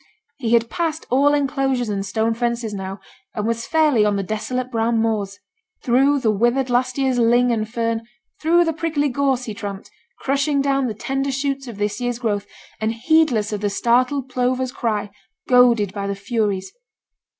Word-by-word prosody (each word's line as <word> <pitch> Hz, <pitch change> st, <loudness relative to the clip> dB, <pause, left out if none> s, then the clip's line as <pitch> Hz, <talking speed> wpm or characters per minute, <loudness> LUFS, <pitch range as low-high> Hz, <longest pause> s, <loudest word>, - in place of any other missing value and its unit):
He 235 Hz, -3 st, 0 dB
had 230 Hz, 0 st, +4 dB
passed 325 Hz, +2 st, -2 dB
all 285 Hz, +3 st, +4 dB
enclosures 270 Hz, -3 st, 0 dB
and 200 Hz, -2 st, -2 dB
stone 220 Hz, +4 st, 0 dB
fences 235 Hz, -1 st, -2 dB
now, 195 Hz, 0 st, -5 dB, 0.4 s
and 210 Hz, -, -2 dB
was 230 Hz, +1 st, -2 dB
fairly 305 Hz, -8 st, +3 dB
on 210 Hz, -1 st, +2 dB
the 200 Hz, -, -1 dB
desolate 250 Hz, +5 st, -3 dB
brown 230 Hz, 0 st, +1 dB
moors; 210 Hz, -3 st, -1 dB, 0.5 s
through 270 Hz, +4 st, +3 dB
the 220 Hz, -, +2 dB
withered 240 Hz, +5 st, +1 dB
last 255 Hz, +1 st, +1 dB
year's 265 Hz, -2 st, +1 dB
ling 240 Hz, +1 st, +4 dB
and 215 Hz, -2 st, -1 dB
fern, 230 Hz, 0 st, -2 dB, 0.3 s
through 340 Hz, +2 st, +4 dB
the 325 Hz, -, 0 dB
prickly 310 Hz, -2 st, 0 dB
gorse, 265 Hz, -1 st, 0 dB
he 220 Hz, -, -5 dB
tramped, 200 Hz, -2 st, -7 dB, 0.3 s
crushing 280 Hz, +1 st, 0 dB
down 275 Hz, -1 st, +1 dB
the 220 Hz, -, -4 dB
tender 270 Hz, +5 st, -2 dB
shoots 275 Hz, 0 st, -2 dB
of 230 Hz, -4 st, -8 dB
this 205 Hz, +2 st, -2 dB
year's 245 Hz, -1 st, -1 dB
growth, 205 Hz, -4 st, -2 dB, 0.3 s
and 220 Hz, +1 st, 0 dB
heedless 240 Hz, -5 st, +2 dB
of 205 Hz, -, -3 dB
the 205 Hz, -, 0 dB
startled 250 Hz, +6 st, +1 dB
plover's 255 Hz, 0 st, -1 dB
cry, 210 Hz, -5 st, -2 dB, 0.4 s
goaded 240 Hz, -6 st, +4 dB
by 200 Hz, -1 st, -3 dB
the 200 Hz, -, -2 dB
furies. 200 Hz, -2 st, -2 dB
240 Hz, 175 wpm, -21 LUFS, 215-270 Hz, 0.5 s, had